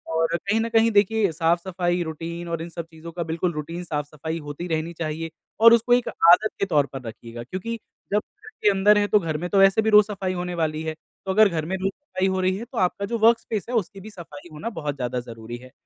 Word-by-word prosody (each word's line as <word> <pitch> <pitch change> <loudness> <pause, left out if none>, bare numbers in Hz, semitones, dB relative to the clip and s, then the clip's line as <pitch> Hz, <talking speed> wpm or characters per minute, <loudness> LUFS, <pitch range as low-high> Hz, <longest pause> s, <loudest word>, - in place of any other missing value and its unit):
और 165 +1 +1
कहीं 200 +6 0
न 230 - -1
कहीं 225 0 +4
देखिए 205 -1 +3
साफ 165 +1 +1
सफाई, 175 -1 -1
रूटीन 170 +2 -6
और 165 -1 -2
इन 170 - -6
सब 170 -1 -6
चीज़ों 160 +1 -10
का 170 +1 -3
बिल्कुल 170 +2 -2
रूटीन 165 +3 -5
साफ-सफाई 155 0 -4
होती 150 +3 -6
रहनी 160 0 -2
चाहिए 160 0 -4 0.3
और 230 +1 +9
उसको 235 +1 +4
एक 245 0 +3
आदत 180 +6 +5
के - - +2
तौर 150 -7 +2
पर 135 - -5
रखिएगा 115 +1 -8
क्योंकि 190 - -5 0.4
जब 210 - +4
घर 330 - -16
के 210 - +6
अंदर 205 +1 +4
हैं 205 0 +2
तो 210 - +5
घर 160 -4 -2
में 175 +3 -4
तो 200 - +1
वैसे 195 +2 +5
भी 220 - +1
रोज़ 210 -1 +7
सफाई 195 -3 -3
होने 180 0 -4
वाली 155 -2 -1
है। 160 0 -3
तो 165 +4 -9
अगर 215 +2 +6
घर 160 -3 -2
में 185 +4 -2
रोज़ 190 +1 -1
सफाई 190 -8 -3
हो 190 0 0
रही 185 0 +1
है 230 - -6
तो 245 0 -11
आपका 190 +1 0
जो 235 +3 -2
वर्कस्पेस 225 -2 +2
है 250 - -2
उसकी 200 -2 -2
भी 215 - -9
सफाई 170 -5 -11
होना 155 +10 -5
बहुत 150 -10 -4
ज़्यादा 125 -2 -2
ज़रूरी 115 -1 -8
है 130 +1 -14
175 Hz, 250 wpm, -24 LUFS, 160-205 Hz, 0.4 s, और